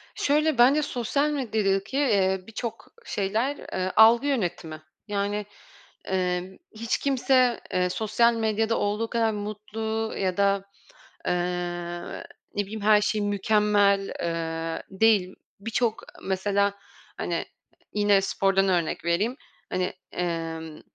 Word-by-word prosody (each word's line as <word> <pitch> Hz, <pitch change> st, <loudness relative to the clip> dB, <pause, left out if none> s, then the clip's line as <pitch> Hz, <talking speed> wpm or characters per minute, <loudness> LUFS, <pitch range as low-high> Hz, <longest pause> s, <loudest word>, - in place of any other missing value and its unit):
Şöyle: 300 Hz, 0 st, +2 dB
Bence 265 Hz, +5 st, +6 dB
sosyal 280 Hz, +1 st, 0 dB
medyadaki, 220 Hz, -4 st, 0 dB
eee, 195 Hz, -8 st, +2 dB
birçok 225 Hz, +1 st, -6 dB, 0.2 s
şeyler, 225 Hz, -, -1 dB, 0.2 s
ııı, 185 Hz, 0 st, -1 dB
algı 230 Hz, +5 st, +7 dB
yönetimi. 175 Hz, -, -2 dB, 0.3 s
Yani, 205 Hz, 0 st, -1 dB, 0.7 s
ımm, 180 Hz, 0 st, -1 dB, 0.2 s
hiç 230 Hz, +3 st, -1 dB
kimse, 255 Hz, -3 st, +2 dB
eee, 180 Hz, 0 st, +2 dB
sosyal 225 Hz, +4 st, +2 dB
medyada 225 Hz, 0 st, 0 dB
olduğu 210 Hz, +2 st, -1 dB
kadar 230 Hz, -2 st, +1 dB
mutlu 215 Hz, +1 st, -4 dB
ya 185 Hz, -2 st, -1 dB
da, 200 Hz, -1 st, +2 dB, 0.6 s
eee, -, -, +2 dB, 1.2 s
ne 205 Hz, -, +1 dB
bileyim, 215 Hz, +2 st, -6 dB
her 210 Hz, 0 st, +5 dB
şey 215 Hz, 0 st, 0 dB
mükemmel, 205 Hz, -1 st, +2 dB
eee, 165 Hz, -1 st, -3 dB
değil. 195 Hz, -2 st, +3 dB, 0.3 s
Birçok 225 Hz, +1 st, -1 dB, 0.2 s
mesela, 200 Hz, +1 st, +1 dB, 0.4 s
hani, -, -, -2 dB, 0.5 s
yine 205 Hz, -1 st, +4 dB
spordan 195 Hz, 0 st, +1 dB
örnek 175 Hz, -4 st, 0 dB
vereyim, 195 Hz, +9 st, +1 dB, 0.3 s
hani, 185 Hz, 0 st, -1 dB, 0.2 s
emm, 165 Hz, -2 st, -4 dB
205 Hz, 110 wpm, -26 LUFS, 190-225 Hz, 1.2 s, algı